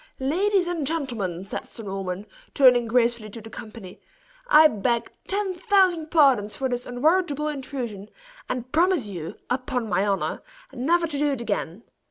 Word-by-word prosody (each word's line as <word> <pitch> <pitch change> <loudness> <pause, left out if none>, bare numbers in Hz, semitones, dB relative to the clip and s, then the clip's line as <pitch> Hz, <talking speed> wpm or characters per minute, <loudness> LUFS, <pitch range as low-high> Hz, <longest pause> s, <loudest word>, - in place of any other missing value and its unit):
"Ladies 365 +8 +1
and 335 -5 -2
gentlemen!" 230 - -3
said - - -5
Sir 225 - -10
Norman, 195 -1 -4 0.3
turning 250 -4 +5
gracefully 235 -2 +1
to 230 - -8
the 225 0 -12
company; 215 -5 -10 0.5
"I 315 -10 +8
beg 235 -1 -1 0.2
ten 395 -1 0
thousand 360 -3 +2
pardons 265 -11 +4
for 265 - -1
this 245 -1 -3
unwarrantable 300 +3 +1
intrusion, 250 -8 -5 0.4
and 255 0 -4
promise 335 - +2
you, 175 -6 -6
upon 250 -2 -2
my 190 -1 +1
honor, 195 -1 -1 0.3
never 335 +7 +1
to 295 -3 -3
do 295 0 +2
it 255 - -4
again. 205 -2 -3
250 Hz, 155 wpm, -24 LUFS, 215-310 Hz, 0.5 s, I